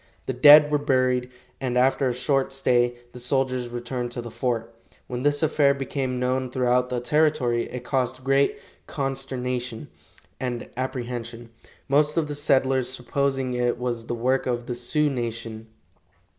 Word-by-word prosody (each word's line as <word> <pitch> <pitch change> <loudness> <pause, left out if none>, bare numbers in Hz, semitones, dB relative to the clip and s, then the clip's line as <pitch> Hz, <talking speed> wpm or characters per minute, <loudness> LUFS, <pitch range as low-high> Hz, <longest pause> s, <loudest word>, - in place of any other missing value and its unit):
The 130 - -2
dead 150 +4 +8
were 150 - +2
buried, 130 -3 +1 0.3
and 125 -2 -1
after 130 +1 +3
a - - -1
short 135 +2 0
stay, 120 -2 +2 0.2
the 125 - -10
soldiers 130 -1 0
returned 120 +1 -4
to 120 - -4
the 120 - -8
fort. 115 -2 -2 0.3
When 125 0 -5
this 145 +2 +1
affair 145 -2 +3
became 135 -2 -3
known 130 +1 0
throughout 125 0 +1
the 125 - -1
territory 125 -3 +1
it 125 -1 -6
caused 130 0 -1
great 135 +1 +2 0.3
consternation 125 -4 -3 0.5
and 125 -2 -3
apprehension, 120 -2 -5 0.4
most 150 +2 +2
of 160 -2 +1
the 145 - -4
settlers 130 -3 +1
supposing 130 +1 -1
it 120 -1 0
was 120 -2 -3
the 120 - -2
work 130 +3 0
of 120 -1 -1
the 125 - -3
Sioux 125 +5 0
nation. 115 -4 -4
125 Hz, 155 wpm, -25 LUFS, 120-135 Hz, 0.5 s, dead